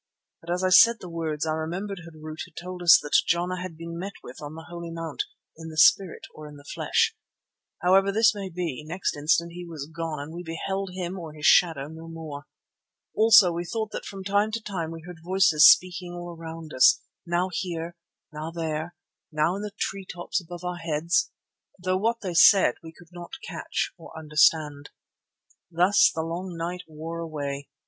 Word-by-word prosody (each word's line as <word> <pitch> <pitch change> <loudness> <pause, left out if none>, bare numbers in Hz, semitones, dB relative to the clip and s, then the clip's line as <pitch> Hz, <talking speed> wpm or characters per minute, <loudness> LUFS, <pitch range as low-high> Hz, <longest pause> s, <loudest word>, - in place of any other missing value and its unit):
But 165 - -13
as 180 +2 -1
I 185 - +3
said 230 +5 +7
the - - -9
words 160 -2 -2
I 160 - -1
remembered 175 +5 -4
Harût 155 -1 -10
had 180 - -21
told 180 0 -7
us 170 -2 +8
that 145 - +3
Jana 180 +1 0
had 180 -3 -7
been 170 0 -7
met 195 +2 -5
with 125 - -11
on 150 +1 -7
the 160 0 -10
Holy 170 -1 -7
Mount 165 -2 -4 0.3
"in 160 0 -10
the 155 - -10
spirit 165 +3 +4
or 155 -1 -10
in 150 - -12
the 145 - -14
flesh." 445 - 0 0.7
However 195 +2 +4
this 225 +2 +4
may 200 -2 -6
be, 165 -5 -4
next 170 +5 -3
instant 165 +3 +1
he 175 +1 -8
was 160 -5 -7
gone 165 -2 -3
and 145 +3 -7
we 175 - -6
beheld 190 +4 -4
him 185 0 -4
or 160 -3 -8
his 150 -1 -7
shadow 160 -6 +4
no 160 +1 -10
more. 160 -3 -8 0.7
Also 215 -5 +7
we 170 +1 -3
thought 220 +4 -4
that - - -6
from 195 -1 -7
time 205 +2 +1
to 230 - -1
time 185 -7 -4
we 165 0 -9
heard 175 -2 -10
voices 175 -4 +6
speaking 180 -1 +2
all 175 -1 -7
around 165 -1 -9
us, 130 - +5 0.3
now 175 +2 0
here, 170 -1 -4 0.4
now 155 +1 -5
there 160 -2 -3
and 170 +2 -8 0.4
now 155 +4 +1
in 200 - -5
the 210 - -4
tree 195 -1 -3
tops 175 +2 -3
above 175 0 -10
our 180 0 -3
heads, 165 - 0 0.5
though 185 0 0
what 230 +4 0
they 185 -3 -4
said 190 +4 +6
we 160 - -10
could 170 +1 -18
not 175 +3 -10
catch - - -3
or 160 - -12
understand. 150 -2 +2 0.8
Thus 180 +4 +4
the 160 - -3
long 170 +2 -5
night 175 +2 -4
wore 160 +2 -7
away. 145 -4 -5
170 Hz, 195 wpm, -26 LUFS, 160-185 Hz, 0.8 s, us